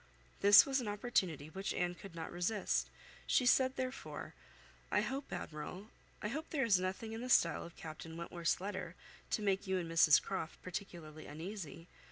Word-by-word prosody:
This 200 0 +9
was 270 -1 +1
an 235 - -4
opportunity 190 - -1
which 195 +3 -3
Anne 175 0 0
could 180 -1 -11
not 165 -1 -5
resist; 185 +4 0 0.4
she 255 - +3
said, 260 +1 +4
therefore, 255 0 -5 0.6
"I 205 - +3
hope, 265 +6 -4
Admiral, 180 +3 -6 0.3
I 210 - 0
hope 310 +7 -4
there 275 -5 +1
is 200 -5 +5
nothing 190 +4 -3
in 225 - -5
the 250 - -5
style 170 -8 +4
of 170 - -10
Captain 160 +1 -8
Wentworth's 170 0 -1
letter 200 +3 -4 0.3
to - - 0
make 195 0 +1
you 190 0 +1
and 175 -2 -2
Mrs 165 -2 +6
Croft 185 -4 -4
particularly 170 -5 -7
uneasy. 165 +1 -7
190 Hz, 175 wpm, -36 LUFS, 165-220 Hz, 0.6 s, This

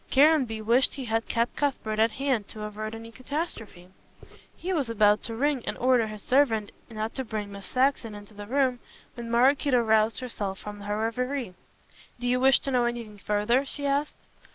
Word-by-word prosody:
Caranby 270 -6 +4
wished 240 +4 +3
he 270 -3 -5
had 225 0 -1
kept 235 +1 0
Cuthbert 225 -7 -1
at 225 +1 +5
hand 260 -6 -1
to 215 - -8
avert 215 +1 -5
any 230 0 -9
catastrophe. 250 - -6 0.7
He 370 +2 -3
was 285 -8 0
about 210 -2 +4
to 230 - -5
ring 275 0 0
and - - -3
order 250 -3 +3
his 215 -1 -8
servant 240 -6 +2 0.2
not 220 0 -4
to 265 - -3
bring 215 -3 -5
Miss 200 -1 -9
Saxon 255 -4 +1
into 205 +1 -12
the 205 0 -9
room 260 0 +1 0.3
when 235 -2 -7
Maraquito 260 +2 +4
roused 220 -1 +2
herself 205 -6 -4
from 205 0 -8
her 205 +1 -2
reverie. 250 0 -2 0.7
"Do 245 - -5
you 250 +1 +2
wish 265 0 +6
to 275 - -3
know 245 -2 +2
anything 230 -3 -4
further?" 210 +6 +1
she 285 +1 -6
asked. 280 +1 -1
230 Hz, 185 wpm, -27 LUFS, 215-265 Hz, 0.7 s, wish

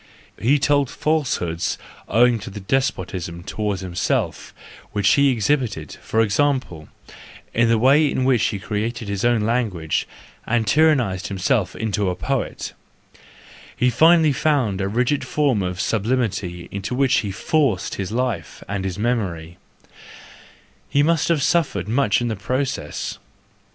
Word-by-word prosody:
He 135 +6 +3
told 140 -1 +2
falsehoods 125 - -1 0.3
owing 120 0 +4
to 105 - -8
the 100 +1 -8
despotism 95 -7 -2
toward 100 0 -3
himself 90 -1 -2 0.4
which 100 -2 +2
he 140 +6 +5
exhibited, 115 - -1
for 110 - +1
example, 115 - 0 0.6
in 115 0 +3
the 115 - +4
way 140 +6 +4
in 130 - -1
which 125 -4 +3
he 105 - -1
created 110 +4 -3
his 100 -1 -3
own 120 -2 +3
language, 105 -8 -1 0.4
and 115 -1 +1
tyrannised 130 -11 +2
himself 100 +3 0
into 105 -3 -1
a 90 - -2
poet:—he 75 -5 -3 1.2
finally 160 +2 +5
found 130 -10 +1
a 95 - 0
rigid 125 +7 0
form 140 -8 +1
of 90 0 -3
sublimity 105 -6 -1
into 100 +5 -4
which 130 -1 +3
he 105 - -3
forced 115 - 0
his 95 0 -4
life 120 -7 -3
and 100 0 -3
his 95 -1 -3
memory; 90 -7 -2 1.3
he 145 - +3
must 165 0 +2
have 160 -5 +2
suffered 135 - +1
much 110 -2 +2
in 120 - -1
the 110 - -2
process. 125 - -3
110 Hz, 135 wpm, -21 LUFS, 95-135 Hz, 1.3 s, he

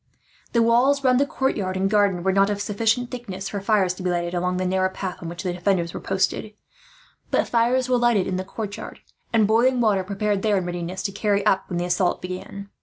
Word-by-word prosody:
The 235 -1 +4
walls 255 +5 +3
round 255 -1 +4
the 280 - +2
courtyard 205 -10 -1
and 190 +1 +1
garden 200 -3 +2
were 190 0 +2
not 195 +1 +4
of 205 -1 -2
sufficient 225 +4 0
thickness 195 -6 -6
for 200 - -4
fires 195 -3 +2
to 185 - -10
be 180 - -1
lighted, 175 0 -1
along 180 +1 -1
the 185 - -1
narrow 185 +1 +1
path 190 -1 -5
on 170 - -5
which 175 +2 -7
the 180 -2 -1
defenders 175 -1 0
were - - -5
posted; 195 +2 -1 0.7
but - - +1
fires 245 +2 +2
were 250 -1 +2
lighted 235 -5 +3
in 185 - -2
the 185 - -2
courtyard, 205 +1 -7 0.3
and 225 -2 +4
boiling 240 +4 +3
water 210 -5 +2
prepared 200 +1 -1
there, 210 -1 +2
in 185 - -1
readiness 175 +1 -4
to 195 - -2
carry 205 0 0
up 190 - +2
when 175 - -2
the 175 - -1
assault 180 0 +1
began. 185 +2 -7
200 Hz, 225 wpm, -23 LUFS, 185-225 Hz, 0.7 s, The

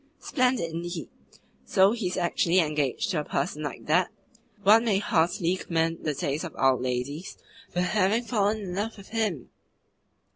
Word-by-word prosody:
"Splendid 250 - 0
indeed! 170 - -5 0.5
So 190 +1 +4
he 225 -5 -2
is 180 - -3
actually 175 0 +1
engaged 150 -2 +1
to 170 - 0
a - - -2
person 150 - -2
like 145 -2 -5
that? 175 +4 +3 0.5
One 215 +3 +7
may 210 -4 +3
heartily 175 -2 +1
commend 165 -2 -1
the 150 -2 0
taste 145 +3 -2
of 170 - -7
our 135 -1 +4
ladies 130 +7 -3 0.3
for 180 - -1
having 210 +4 +2
fallen 215 -2 0
in 185 -3 -5
love 215 +4 -3
with 195 - -13
him!" 215 - -2
180 Hz, 160 wpm, -27 LUFS, 155-205 Hz, 0.5 s, One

